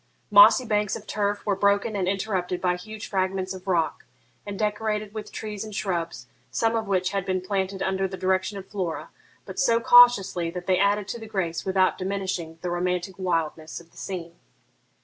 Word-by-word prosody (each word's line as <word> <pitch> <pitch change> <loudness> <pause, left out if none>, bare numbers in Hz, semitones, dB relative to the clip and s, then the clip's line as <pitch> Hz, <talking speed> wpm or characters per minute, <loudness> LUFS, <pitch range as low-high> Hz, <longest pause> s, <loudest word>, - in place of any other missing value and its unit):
Mossy 215 +4 +8
banks 210 -2 0
of 215 - -8
turf 205 -1 -2
were 205 -2 +1
broken 200 +2 +2
and 190 -2 -1
interrupted 190 -2 -1
by 180 -1 +1
huge 215 +4 -8
fragments 190 -1 -1
of 185 0 -11
rock, 170 -4 0 0.4
and 200 -1 -5
decorated 210 0 -1
with 215 -1 -7
trees 210 -1 -5
and 215 -2 -8
shrubs, 170 - -3 0.2
some 225 0 +1
of 220 -2 -1
which 185 -1 +1
had 195 -1 -1
been 185 0 -1
planted 190 0 -2
under 190 0 0
the 190 0 -7
direction 190 +2 0
of 195 - -7
Flora, 185 -6 -4 0.3
but - - -7
so 230 -3 +3
cautiously 235 -8 +6
that 180 +1 -6
they 185 -1 +2
added 200 0 +2
to 235 +4 -5
the 220 - -9
grace 185 -6 -2
without 190 -1 +2
diminishing 185 -4 -3
the 180 - -2
romantic 180 +1 -1
wildness 165 -3 -2
of 170 0 -18
the - - -22
scene. 170 -3 -6
190 Hz, 190 wpm, -25 LUFS, 180-210 Hz, 0.4 s, Mossy